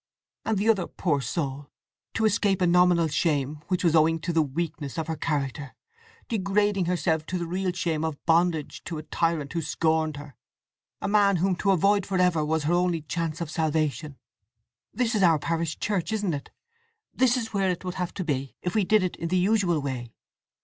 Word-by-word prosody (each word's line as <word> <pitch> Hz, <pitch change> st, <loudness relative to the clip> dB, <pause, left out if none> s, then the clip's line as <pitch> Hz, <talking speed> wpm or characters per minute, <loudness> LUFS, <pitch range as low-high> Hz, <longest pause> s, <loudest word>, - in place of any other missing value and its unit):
And 220 Hz, -, +1 dB
the 205 Hz, +3 st, 0 dB
other 205 Hz, -5 st, +3 dB
poor 150 Hz, -6 st, -1 dB
soul—to 140 Hz, -, -5 dB
escape 200 Hz, -3 st, +2 dB
a 180 Hz, -, +3 dB
nominal 175 Hz, -1 st, +4 dB
shame 145 Hz, -1 st, 0 dB
which 185 Hz, -1 st, -1 dB
was 165 Hz, -2 st, +3 dB
owing 160 Hz, +1 st, +4 dB
to 170 Hz, +1 st, -2 dB
the 165 Hz, -, +4 dB
weakness 150 Hz, -1 st, -4 dB
of 160 Hz, -, -1 dB
her 160 Hz, 0 st, -3 dB
character, 145 Hz, -3 st, -3 dB, 0.5 s
degrading 205 Hz, -2 st, +1 dB
herself 170 Hz, -3 st, 0 dB
to 185 Hz, -, -2 dB
the 170 Hz, -, -3 dB
real 185 Hz, +2 st, -1 dB
shame 165 Hz, -3 st, -2 dB
of 160 Hz, -3 st, -2 dB
bondage 165 Hz, -2 st, +1 dB
to 165 Hz, -, -4 dB
a 155 Hz, -, -6 dB
tyrant 160 Hz, -2 st, -1 dB
who 170 Hz, -, -1 dB
scorned 160 Hz, -1 st, 0 dB
her—a 145 Hz, -1 st, -12 dB
man 200 Hz, -1 st, +4 dB
whom 185 Hz, +2 st, +1 dB
to 200 Hz, -, 0 dB
avoid 195 Hz, +1 st, +3 dB
for 195 Hz, -, -1 dB
ever 180 Hz, -4 st, +3 dB
was 155 Hz, 0 st, 0 dB
her 155 Hz, +4 st, +1 dB
only 175 Hz, -3 st, +1 dB
chance 165 Hz, +1 st, -3 dB
of 160 Hz, -2 st, -4 dB
salvation… 155 Hz, -3 st, -1 dB, 0.7 s
This 240 Hz, +1 st, 0 dB
is 210 Hz, -, +1 dB
our 170 Hz, -4 st, +5 dB
parish 165 Hz, +1 st, -2 dB
church, 200 Hz, -3 st, -1 dB
isn't 205 Hz, -5 st, 0 dB
it? 140 Hz, -2 st, -5 dB, 0.6 s
This 255 Hz, 0 st, +3 dB
is 225 Hz, -3 st, -4 dB
where 195 Hz, -2 st, +1 dB
it 180 Hz, 0 st, -3 dB
would 180 Hz, -, -3 dB
have 180 Hz, -, -3 dB
to 190 Hz, -, -3 dB
be, 140 Hz, -4 st, -3 dB
if 180 Hz, -, -2 dB
we 215 Hz, -, +2 dB
did 215 Hz, +1 st, +3 dB
it 180 Hz, -, -2 dB
in 170 Hz, -, -3 dB
the 185 Hz, +2 st, +1 dB
usual 185 Hz, -3 st, +2 dB
way? 125 Hz, -4 st, -5 dB
170 Hz, 195 wpm, -26 LUFS, 155-190 Hz, 0.7 s, our